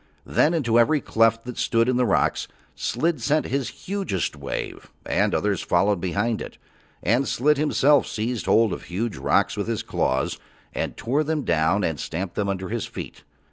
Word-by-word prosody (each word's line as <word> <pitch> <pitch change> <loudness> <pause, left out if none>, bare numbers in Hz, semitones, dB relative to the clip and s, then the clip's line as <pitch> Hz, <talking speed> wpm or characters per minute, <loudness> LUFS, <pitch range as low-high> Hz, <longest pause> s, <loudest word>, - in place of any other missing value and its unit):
Then 165 +3 +2
into 120 -7 +2
every 150 +6 +4
cleft 115 -2 +2
that 125 -1 -6
stood 115 0 +2
in 130 - +2
the 125 -1 +2
rocks 95 - +1 0.3
Slid 160 +6 -1
sent 150 +2 +1
his 135 -1 -1 0.2
hugest 190 - -2
wave 70 -1 -5 0.2
and - - +1
others - - 0
followed 100 -3 +2
behind 105 +5 -1
it, - - -8 0.5
and 125 +4 +2
Slid 135 +7 +2
himself 150 -1 +3
seized 115 +2 -3
hold 115 -2 +4
of - - -7
huge 105 +5 -3
rocks 65 - +2
with - - -3
his - - -2
claws 65 +1 -1 0.3
and - - -3
tore 135 +6 0
them 155 -1 -1
down 85 +3 +2
and 80 -4 -1
stamped 90 +6 -4
them 100 -1 -1
under 95 -1 -3
his 115 0 -3
feet. - - -8
115 Hz, 180 wpm, -24 LUFS, 100-140 Hz, 0.5 s, every